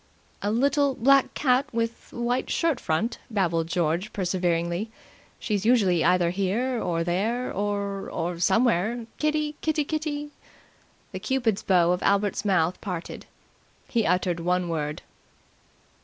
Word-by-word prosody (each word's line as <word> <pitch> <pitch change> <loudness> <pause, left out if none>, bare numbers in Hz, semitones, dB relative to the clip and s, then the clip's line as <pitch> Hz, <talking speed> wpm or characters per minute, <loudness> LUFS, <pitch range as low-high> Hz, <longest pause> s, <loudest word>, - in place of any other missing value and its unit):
"A 205 - -1
little 275 +4 +2
black 275 +2 +4
cat 265 +1 +2
with 230 0 -3
white 240 +2 -1
shirt 330 -6 +1
front," 190 +10 -1
babbled 170 -7 0
George 170 +4 -1
perseveringly. 175 +1 -1 0.5
"She's 205 -3 -1
usually 205 -8 +3
either 175 -1 +3
here 220 +7 -1
or 165 -1 -1
there, 215 +9 -1
or 200 0 -2
or 170 0 -3
somewhere. 225 +3 +2
Kitty, 305 0 0
Kitty, 310 -1 +1
Kitty!" 295 -1 -3 0.8
The 185 - -5
cupid's 225 -1 0
bow 175 -2 +3
of 180 - 0
Albert's 200 0 +1
mouth 185 -4 +1
parted. 180 -4 -6 0.6
He 230 -3 +1
uttered 180 -1 +1
one 180 +1 0
word. 150 -2 -3
200 Hz, 125 wpm, -26 LUFS, 175-245 Hz, 0.8 s, black